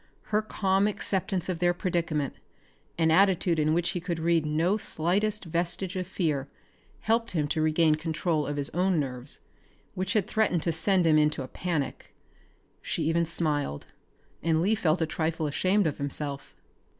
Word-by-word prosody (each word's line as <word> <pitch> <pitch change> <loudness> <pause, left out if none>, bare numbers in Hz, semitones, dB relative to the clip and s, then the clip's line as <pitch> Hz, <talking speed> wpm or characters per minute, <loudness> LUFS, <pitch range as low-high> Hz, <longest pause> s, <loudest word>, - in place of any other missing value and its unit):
Her 210 - +4
calm 195 -2 +1
acceptance 190 -3 -1
of 180 -3 -2
their 175 0 +2
predicament, 165 -6 -1 0.6
an 160 -1 +3
attitude 180 -1 +3
in 155 0 +2
which 170 +1 +1
he 180 - -3
could 175 -1 -3
read 165 -1 +1
no 165 +6 +2
slightest 200 +2 0
vestige 175 +3 -2
of 185 -1 -3
fear, 150 -7 -1 0.5
helped 230 0 0
him 150 -4 0
to 155 - 0
regain 155 0 +3
control 155 -1 -1
of 145 0 -3
his 140 -1 -2
own 180 -1 +1
nerves, 130 -1 -2 0.5
which 185 +2 -2
had 210 -5 +2
threatened 205 -7 +1
to 170 - +1
send 180 +2 +2
him 155 -1 +5
into 150 -2 +1
a - - -7
panic. 155 -3 -4 0.7
She - - -2
even 165 +1 +1
smiled, 150 - -1 0.6
and 160 -1 +2
Lee 195 +6 +2
felt 170 -5 +1
a - - +2
trifle 160 0 -2
ashamed 185 +7 +1
of 150 -2 -1
himself. 140 0 -4
170 Hz, 165 wpm, -28 LUFS, 155-185 Hz, 0.7 s, him